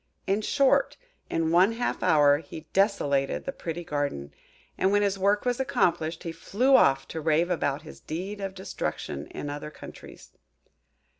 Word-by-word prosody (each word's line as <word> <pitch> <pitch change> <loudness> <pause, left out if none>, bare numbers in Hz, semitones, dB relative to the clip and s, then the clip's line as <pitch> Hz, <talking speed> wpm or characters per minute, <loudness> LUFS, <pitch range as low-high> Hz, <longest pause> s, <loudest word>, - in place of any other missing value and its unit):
In 200 +2 +1
short, 275 +4 +2 0.3
in 165 -1 0
one 185 +6 +5
half 240 +1 -2
hour 145 -2 +5
he 160 0 -9
desolated 145 -9 +1
the 275 - -2
pretty 175 - -5
garden; 145 - -3 0.4
and 190 - +1
when 205 0 +3
his 195 -1 0
work 200 +3 +2
was 245 0 0
accomplished, 170 -10 0
he 165 - -4
flew 250 +10 +2
off 135 - +4
to 160 - -5
rave 165 +3 +2
about 145 -3 -1
his 155 - -12
deed 190 +6 -5
of 195 -1 -4
destruction 75 - -5
in - - -7
other 145 +1 -5
countries. 150 - -12
170 Hz, 160 wpm, -27 LUFS, 150-200 Hz, 0.4 s, one